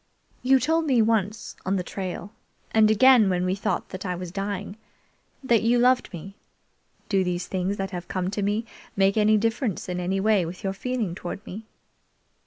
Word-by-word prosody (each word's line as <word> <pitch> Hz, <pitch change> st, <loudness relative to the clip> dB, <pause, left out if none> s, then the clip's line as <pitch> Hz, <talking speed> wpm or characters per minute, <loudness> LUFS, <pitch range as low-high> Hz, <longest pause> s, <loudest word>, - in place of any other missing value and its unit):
"You 265 Hz, +1 st, +4 dB
told 320 Hz, +5 st, +1 dB
me 260 Hz, -4 st, +3 dB
once 220 Hz, -1 st, 0 dB
on 190 Hz, +2 st, 0 dB
the 185 Hz, -, -1 dB
trail, 190 Hz, +2 st, -6 dB, 0.4 s
and 220 Hz, -1 st, +5 dB
again 235 Hz, -1 st, +6 dB
when 180 Hz, -1 st, 0 dB
we 185 Hz, -, +1 dB
thought 195 Hz, -, -2 dB
that 185 Hz, -, -7 dB
I 180 Hz, -1 st, -2 dB
was 175 Hz, -1 st, -6 dB
dying, 200 Hz, +1 st, -4 dB, 0.7 s
that 235 Hz, -4 st, +3 dB
you 235 Hz, +2 st, +3 dB
loved 250 Hz, +1 st, +3 dB
me. 190 Hz, +2 st, -9 dB, 0.7 s
Do 195 Hz, -2 st, +2 dB
these 180 Hz, 0 st, -2 dB
things 190 Hz, +2 st, -2 dB
that 195 Hz, 0 st, -3 dB
have 175 Hz, -1 st, -6 dB
come 185 Hz, 0 st, -2 dB
to 205 Hz, -, -2 dB
me 205 Hz, +3 st, 0 dB, 0.3 s
make 195 Hz, 0 st, +3 dB
any 215 Hz, 0 st, +4 dB
difference 225 Hz, -1 st, -1 dB
in 180 Hz, -1 st, -3 dB
any 185 Hz, +2 st, -1 dB
way 210 Hz, -2 st, +3 dB
with 170 Hz, +2 st, -7 dB
your 195 Hz, -1 st, -1 dB
feeing 230 Hz, -3 st, -2 dB
toward 180 Hz, +3 st, -7 dB
me?" 215 Hz, +4 st, -8 dB
200 Hz, 190 wpm, -25 LUFS, 185-225 Hz, 0.7 s, again